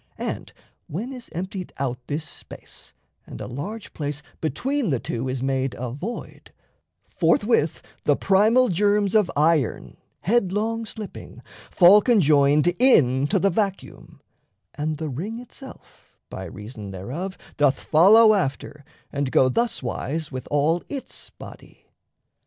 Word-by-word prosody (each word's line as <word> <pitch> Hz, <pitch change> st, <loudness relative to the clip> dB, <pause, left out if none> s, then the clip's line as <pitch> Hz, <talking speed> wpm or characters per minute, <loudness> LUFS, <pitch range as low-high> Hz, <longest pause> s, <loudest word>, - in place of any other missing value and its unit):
And -, -, -4 dB, 0.4 s
when 225 Hz, -, -5 dB
is 250 Hz, -2 st, -10 dB
emptied 185 Hz, +2 st, -5 dB
out 130 Hz, -2 st, -2 dB
This 150 Hz, +2 st, -3 dB
space, -, -, -11 dB, 0.3 s
and -, -, -9 dB
a -, -, -5 dB
large 185 Hz, -, -7 dB
place 145 Hz, -1 st, -4 dB, 0.2 s
between 245 Hz, -, -1 dB
the 135 Hz, -5 st, 0 dB
two 120 Hz, +3 st, -4 dB
Is 130 Hz, 0 st, -3 dB
made 135 Hz, -1 st, -1 dB
a 125 Hz, -1 st, -4 dB
void, 185 Hz, -, -7 dB, 0.7 s
forthwith 170 Hz, -1 st, +2 dB, 0.2 s
the 145 Hz, -, +4 dB
primal 220 Hz, -, +3 dB
germs 205 Hz, +2 st, +2 dB
Of 210 Hz, -4 st, +3 dB
iron, 150 Hz, -4 st, +1 dB, 0.2 s
headlong 225 Hz, +2 st, 0 dB
slipping, 215 Hz, -3 st, -9 dB, 0.3 s
fall 190 Hz, +3 st, +7 dB
conjoined 150 Hz, -, +4 dB
Into 145 Hz, -, +4 dB
the 195 Hz, +1 st, +2 dB
vacuum, 195 Hz, +1 st, -4 dB, 0.5 s
and 150 Hz, +1 st, -3 dB
the 160 Hz, 0 st, -4 dB
ring 195 Hz, -, -5 dB
itself 250 Hz, +2 st, -13 dB
By -, -, -6 dB
reason 105 Hz, 0 st, -9 dB
thereof 135 Hz, -, -6 dB, 0.2 s
doth 145 Hz, -2 st, +3 dB
follow 215 Hz, +8 st, +6 dB
after 150 Hz, -5 st, -2 dB, 0.3 s
and 140 Hz, -2 st, -1 dB
go 130 Hz, +2 st, +4 dB
Thuswise 155 Hz, -, -2 dB
with 130 Hz, 0 st, -6 dB
all 150 Hz, +4 st, +2 dB
its 275 Hz, -2 st, -7 dB
body. -, -, -14 dB
165 Hz, 130 wpm, -23 LUFS, 140-210 Hz, 0.7 s, fall